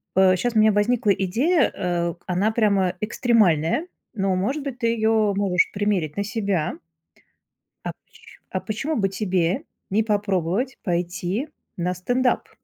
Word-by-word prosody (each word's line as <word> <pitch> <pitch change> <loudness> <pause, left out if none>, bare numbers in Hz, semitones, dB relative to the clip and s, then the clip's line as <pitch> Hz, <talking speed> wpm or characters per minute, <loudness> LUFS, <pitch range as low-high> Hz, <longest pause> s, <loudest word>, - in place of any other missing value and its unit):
э, 190 0 +5
щас 240 +4 -1
у - - +5
меня 215 0 +6
возникла 215 +2 +2
идея, 240 - +2
э, 170 -1 -1
она 190 +4 +1
прямо 200 -5 +2
экстремальная, 215 - +2 0.3
но, 195 -4 0
может 260 +11 -1
быть, 270 -3 -5
ты 230 - +1
её 220 -2 +2
можешь 190 -3 +2
примерить 200 -7 -1
на 200 - +1
себя. 200 -7 -2 1.1
А - - -1
поч - - -54 0.5
а - - -2
почему 275 +9 -3
бы 195 -3 +1
тебе 190 - 0 0.3
не 210 +3 +3
попробовать 205 +3 -1
пойти 180 - -2 0.3
на 180 +1 -1
стендап? 245 +8 0
205 Hz, 140 wpm, -23 LUFS, 180-230 Hz, 1.1 s, меня